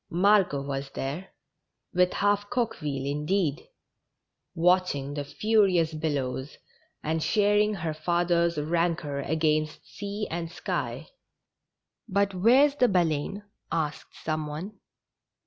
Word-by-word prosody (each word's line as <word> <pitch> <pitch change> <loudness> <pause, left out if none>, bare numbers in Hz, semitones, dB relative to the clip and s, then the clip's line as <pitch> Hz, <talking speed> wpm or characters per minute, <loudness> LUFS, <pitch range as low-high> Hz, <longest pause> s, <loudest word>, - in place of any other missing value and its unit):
Margot 180 -5 +3
was 140 0 -4
there 145 +8 -4 0.3
— - - -54
with 180 0 +3
half 205 0 +1
Coqueville, 155 - -2
indeed 150 +2 -1 0.4
— - - -56
watch 180 0 +3
ing 140 0 -5
the 145 0 -3
furious 185 -1 +2
billows, 145 -3 -3 0.5
and 160 +1 -1
sharing 210 +3 +3
her 165 -4 -3
father's 170 +1 +1
rancor 160 -2 0
against 155 +1 0
sea 205 +1 -5
and 165 0 -3
sky. 175 - -3 1.0
''But 200 +1 +2
where's 250 +10 +5
the 250 - +5
Baleine? 175 +1 0 0.2
" - - -42 0.2
asked 150 - -14
some 155 -1 -1
one. 180 +8 -7
170 Hz, 120 wpm, -27 LUFS, 150-200 Hz, 1.0 s, where's